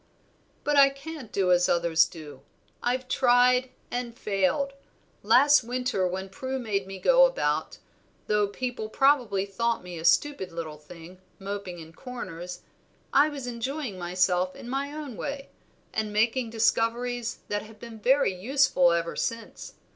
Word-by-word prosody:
"But 295 Hz, -, +1 dB
I 275 Hz, -1 st, +8 dB
can't 275 Hz, -3 st, -9 dB
do 190 Hz, -2 st, +1 dB
as 180 Hz, 0 st, +4 dB
others 170 Hz, -1 st, +3 dB
do; 150 Hz, -5 st, -11 dB, 0.4 s
I've 255 Hz, +1 st, -1 dB
tried, 250 Hz, 0 st, +4 dB, 0.2 s
and 245 Hz, -1 st, -4 dB
failed. 210 Hz, +8 st, 0 dB, 0.5 s
Last 270 Hz, +7 st, +5 dB
winter, 245 Hz, -5 st, -1 dB
when 190 Hz, +2 st, -4 dB
Prue 265 Hz, +6 st, -4 dB
made 205 Hz, -6 st, -2 dB
me 195 Hz, 0 st, -7 dB
go -, -, +6 dB
about, -, -, -2 dB, 0.5 s
though 210 Hz, -1 st, +2 dB
people 230 Hz, +1 st, -4 dB
probably 240 Hz, -7 st, +2 dB
thought 230 Hz, +3 st, -1 dB
me 175 Hz, -2 st, -7 dB
a -, -, -7 dB
stupid 280 Hz, +1 st, +2 dB
little 160 Hz, -3 st, -6 dB
thing, 170 Hz, +4 st, -13 dB, 0.2 s
moping 195 Hz, -2 st, -6 dB
in 165 Hz, -1 st, -11 dB
corners, 180 Hz, -7 st, -7 dB, 0.5 s
I 290 Hz, +3 st, +5 dB
was 280 Hz, -4 st, -6 dB
enjoying 245 Hz, -2 st, -4 dB
myself 180 Hz, +1 st, +1 dB
in -, -, -10 dB
my 275 Hz, +3 st, -2 dB
own 295 Hz, -6 st, -7 dB
way, 280 Hz, -1 st, -5 dB, 0.4 s
and 215 Hz, -1 st, -2 dB
making 225 Hz, +3 st, +1 dB
discoveries 230 Hz, +1 st, 0 dB
that 205 Hz, 0 st, -1 dB
have 215 Hz, 0 st, -13 dB
been 230 Hz, -2 st, -10 dB
very 260 Hz, -2 st, +3 dB
useful 185 Hz, -4 st, +3 dB
ever 170 Hz, 0 st, -1 dB
since. 230 Hz, 0 st, -5 dB
225 Hz, 145 wpm, -27 LUFS, 185-260 Hz, 0.5 s, I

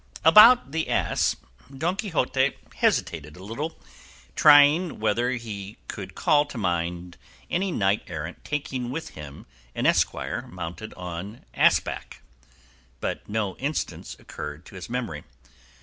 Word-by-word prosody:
About 215 Hz, -, +8 dB
the 160 Hz, +1 st, -2 dB
ass, -, -, +1 dB, 0.4 s
Don 170 Hz, +6 st, 0 dB
Quixote 140 Hz, -, 0 dB, 0.2 s
hesitated 75 Hz, -2 st, 0 dB
a 90 Hz, -, -11 dB
little, 140 Hz, +11 st, -5 dB, 0.6 s
trying 150 Hz, +3 st, +6 dB
whether 115 Hz, +3 st, +1 dB
he 110 Hz, -5 st, -5 dB
could -, -, -7 dB
call 145 Hz, -1 st, +3 dB
to 140 Hz, -, -9 dB
mind 85 Hz, -2 st, -2 dB, 0.3 s
any 190 Hz, +2 st, 0 dB
knight 100 Hz, -, +1 dB
errant 85 Hz, 0 st, -6 dB
taking 130 Hz, -4 st, -3 dB
with 160 Hz, +6 st, -5 dB
him 75 Hz, -2 st, -10 dB, 0.3 s
an -, -, -2 dB
esquire -, -, +1 dB
mounted 90 Hz, +4 st, -7 dB
on 90 Hz, +5 st, -7 dB
ass -, -, +5 dB
back, -, -, -8 dB, 0.8 s
but -, -, -4 dB
no 105 Hz, -2 st, -1 dB
instance 145 Hz, +4 st, -3 dB
occurred 75 Hz, +3 st, -8 dB
to -, -, -14 dB
his 95 Hz, -2 st, -8 dB
memory. 115 Hz, -, -4 dB
110 Hz, 130 wpm, -25 LUFS, 90-150 Hz, 0.8 s, About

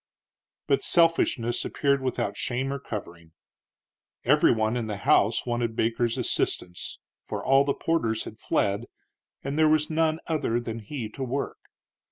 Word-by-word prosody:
But 410 Hz, -, +2 dB
selfishness 165 Hz, -, +2 dB
appeared 140 Hz, -1 st, +1 dB
without 125 Hz, -2 st, -2 dB
shame 130 Hz, +3 st, -2 dB
or 140 Hz, -, -4 dB
covering. 85 Hz, -9 st, -8 dB, 0.9 s
Every -, -, +5 dB
one 110 Hz, 0 st, +1 dB
in 120 Hz, -2 st, -2 dB
the 105 Hz, -2 st, -3 dB
house 105 Hz, +2 st, +3 dB
wanted 120 Hz, -2 st, -1 dB
Baker's 115 Hz, +2 st, 0 dB
assistance, 90 Hz, -7 st, -2 dB, 0.3 s
for -, -, -4 dB
all 135 Hz, +1 st, +5 dB
the 140 Hz, 0 st, 0 dB
porters 115 Hz, -10 st, 0 dB
had 110 Hz, -, -10 dB
fled, 100 Hz, +4 st, 0 dB, 0.6 s
and 140 Hz, +3 st, -2 dB
there 155 Hz, -1 st, +5 dB
was 155 Hz, 0 st, +2 dB
none 160 Hz, 0 st, +1 dB
other 150 Hz, -7 st, 0 dB
than 115 Hz, -1 st, -5 dB
he 115 Hz, +1 st, -5 dB
to 135 Hz, +5 st, -6 dB
work. 135 Hz, +2 st, -3 dB
120 Hz, 150 wpm, -26 LUFS, 110-140 Hz, 0.9 s, Every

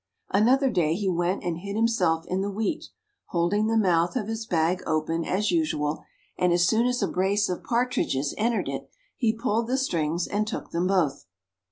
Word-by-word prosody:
Another 255 Hz, +6 st, +3 dB
day 165 Hz, -5 st, +1 dB
he 200 Hz, +1 st, -2 dB
went 175 Hz, +1 st, 0 dB
and 170 Hz, -1 st, -2 dB
hid 200 Hz, +2 st, -6 dB
himself 185 Hz, -8 st, +1 dB
in 185 Hz, +1 st, -1 dB
the 200 Hz, -, -1 dB
wheat, 220 Hz, +10 st, -2 dB, 0.4 s
holding 185 Hz, +5 st, +1 dB
the 225 Hz, 0 st, +2 dB
mouth 175 Hz, -3 st, +2 dB
of 220 Hz, -5 st, -1 dB
his 225 Hz, 0 st, -4 dB
bag 170 Hz, +2 st, +1 dB
open, 160 Hz, +1 st, 0 dB
as 200 Hz, +5 st, 0 dB
usual, 155 Hz, -, 0 dB, 0.4 s
and 180 Hz, -1 st, +3 dB
as 175 Hz, 0 st, +4 dB
soon 230 Hz, +3 st, +3 dB
as 250 Hz, 0 st, 0 dB
a -, -, +2 dB
brace 200 Hz, +3 st, +1 dB
of 180 Hz, -, -3 dB
partridges 235 Hz, -, 0 dB
entered 230 Hz, +2 st, 0 dB
it, -, -, -5 dB, 0.3 s
he 230 Hz, -3 st, +2 dB
pulled 225 Hz, 0 st, -1 dB
the 255 Hz, +2 st, +1 dB
strings, 170 Hz, -, 0 dB
and 210 Hz, +1 st, -1 dB
took 215 Hz, -, -5 dB
them 175 Hz, +2 st, 0 dB
both. 160 Hz, -, 0 dB
195 Hz, 190 wpm, -26 LUFS, 170-225 Hz, 0.4 s, as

